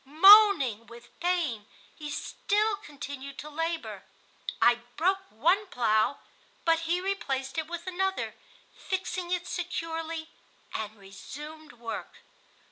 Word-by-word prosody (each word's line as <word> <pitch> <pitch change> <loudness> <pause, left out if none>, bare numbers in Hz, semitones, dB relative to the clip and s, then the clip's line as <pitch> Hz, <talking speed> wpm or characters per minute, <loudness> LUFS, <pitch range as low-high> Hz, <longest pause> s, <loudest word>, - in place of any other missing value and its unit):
Moaning 310 - +7
with 235 0 -15
pain, 325 - 0 0.3
he 300 -1 -7
still 420 +7 0
continued 280 -4 -8
to 300 - -7
labor. 325 +2 -3 0.6
I 240 0 +5 0.2
broke 385 +4 +1
one 350 - +2
plow, 225 -2 +2 0.5
but 330 0 +2
he 350 +1 +3
replaced 275 -8 -2
it 315 - -3
with 345 0 -6
another, 380 +1 -1 0.4
fixing 370 -2 -3
it 355 0 -1
securely, 330 -2 -4 0.4
and 215 0 -4
resumed 295 +10 -10
work. 235 -1 -7
320 Hz, 115 wpm, -29 LUFS, 265-360 Hz, 0.6 s, Moaning